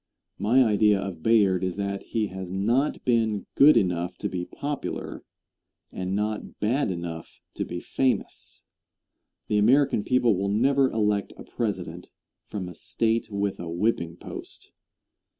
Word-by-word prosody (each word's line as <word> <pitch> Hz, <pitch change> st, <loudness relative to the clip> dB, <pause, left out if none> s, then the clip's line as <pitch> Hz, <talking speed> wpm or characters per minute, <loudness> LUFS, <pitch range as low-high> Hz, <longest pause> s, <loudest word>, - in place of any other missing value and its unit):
My 125 Hz, +5 st, +4 dB
idea 105 Hz, -2 st, +3 dB
of 95 Hz, -4 st, -5 dB
Bayard 100 Hz, -4 st, +3 dB
is 95 Hz, -1 st, -1 dB
that 100 Hz, -1 st, -3 dB
he 110 Hz, -2 st, -1 dB
has 95 Hz, -1 st, -7 dB
not 115 Hz, +10 st, 0 dB
been 110 Hz, -4 st, +1 dB
good 150 Hz, +2 st, +7 dB
enough 90 Hz, -1 st, 0 dB
to -, -, -3 dB
be 90 Hz, -1 st, -3 dB
popular, 145 Hz, +7 st, -5 dB, 0.7 s
and 95 Hz, +1 st, -3 dB
not 105 Hz, +1 st, -3 dB
bad 120 Hz, +4 st, +1 dB
enough 85 Hz, -2 st, -6 dB
to -, -, -3 dB
be 85 Hz, -, -5 dB
famous. 130 Hz, +7 st, -2 dB, 0.8 s
The 105 Hz, -, +2 dB
American 125 Hz, 0 st, +4 dB
people 125 Hz, -4 st, +3 dB
will 100 Hz, +2 st, -1 dB
never 135 Hz, +6 st, +3 dB
elect 105 Hz, -2 st, 0 dB
a -, -, -9 dB
President -, -, -4 dB, 0.4 s
from 95 Hz, -4 st, -5 dB
a 90 Hz, -, -8 dB
State 115 Hz, 0 st, -1 dB
with 100 Hz, -1 st, -2 dB
a 85 Hz, -, -5 dB
whipping 85 Hz, -2 st, -1 dB
post. -, -, -10 dB
105 Hz, 145 wpm, -26 LUFS, 95-115 Hz, 0.8 s, good